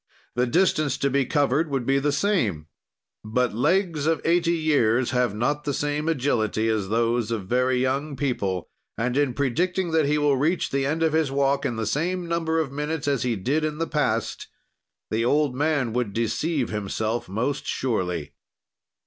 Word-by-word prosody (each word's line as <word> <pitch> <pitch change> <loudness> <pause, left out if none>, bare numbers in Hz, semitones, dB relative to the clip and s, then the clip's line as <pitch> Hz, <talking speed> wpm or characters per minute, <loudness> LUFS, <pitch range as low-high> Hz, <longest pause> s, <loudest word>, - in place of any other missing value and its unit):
"The 125 +1 +1
distance 155 -2 +2
to 140 - 0
be 135 -1 +1
covered 145 +2 +1
would 135 -4 -1
be 135 +2 +3
the 145 +1 +1
same; 140 - 0 0.6
but 120 +3 0
legs 160 - +1
of 160 -2 +2
eighty 170 0 +3
years 130 -6 +2
have 125 -5 +1
not 145 +7 0
the 145 -2 -2
same 145 +2 -1
agility 115 -7 0
as 105 -4 -1
those 115 0 +1
of 110 -5 -3
very 125 +4 +1
young 140 +3 -1
people, 100 - -2 0.3
and 125 +2 -1
in 140 -3 +1
predicting 175 +7 0
that 160 -3 +2
he 150 +1 +2
will 145 -2 +2
reach 160 +7 0
the 135 0 0
end 160 +3 0
of 160 -1 +2
his 160 -3 +2
walk 140 0 +1
in 120 - -3
the 110 0 -2
same 170 - -1
number 165 -1 0
of 155 -4 -1
minutes 150 +1 -3
as 140 -4 +1
he 120 -1 0
did 135 +11 0
in 155 -1 -2
the 165 - -1
past, 130 -9 -1 0.6
the 110 +1 +1
old 145 +2 +2
man 145 -5 0
would 120 -4 -1
deceive 120 +5 -1
himself 110 +1 -2
most 125 +8 -2
surely. 90 - -2
140 Hz, 180 wpm, -24 LUFS, 115-155 Hz, 0.6 s, be